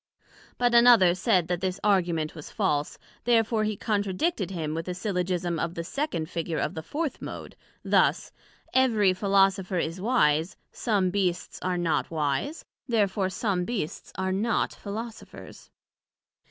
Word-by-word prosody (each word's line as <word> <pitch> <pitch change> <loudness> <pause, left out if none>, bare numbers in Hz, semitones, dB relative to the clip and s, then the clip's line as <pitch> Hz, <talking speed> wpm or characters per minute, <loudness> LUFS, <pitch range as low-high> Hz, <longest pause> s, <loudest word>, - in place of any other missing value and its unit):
But 245 -1 +2
another 235 -7 +7
said 185 -2 +2
that 175 0 -2
this 190 0 -2
Argument 175 -6 +1
was 155 -3 -9
false, 145 0 -1 0.3
therefore 225 -2 +2
he 215 -1 -2
contradicted 205 - -1
him 160 -5 -3
with 165 +2 -4
a 180 - -3
Syllogism 180 -3 -1
of 170 +1 -2
the 170 - -3
second 180 - -3
Figure 165 -1 -3
of - - -1
the 160 - -5
fourth 295 - -4
Mode, - - -7 0.3
thus: - - +2 0.4
Every 220 -7 +4
Philosopher 195 -1 +2
is 170 +2 -2
wise: 175 -7 +2
some 200 -5 0
Beasts 180 -3 -1
are 180 -1 -1
not 160 -6 0
wise, 155 - -2 0.2
Therefore 205 -5 +1
some 190 -2 -1
Beasts 195 -6 -4
are 190 +1 -1
not 215 +4 0
Philosophers. 220 +3 -8
190 Hz, 140 wpm, -27 LUFS, 170-215 Hz, 0.4 s, another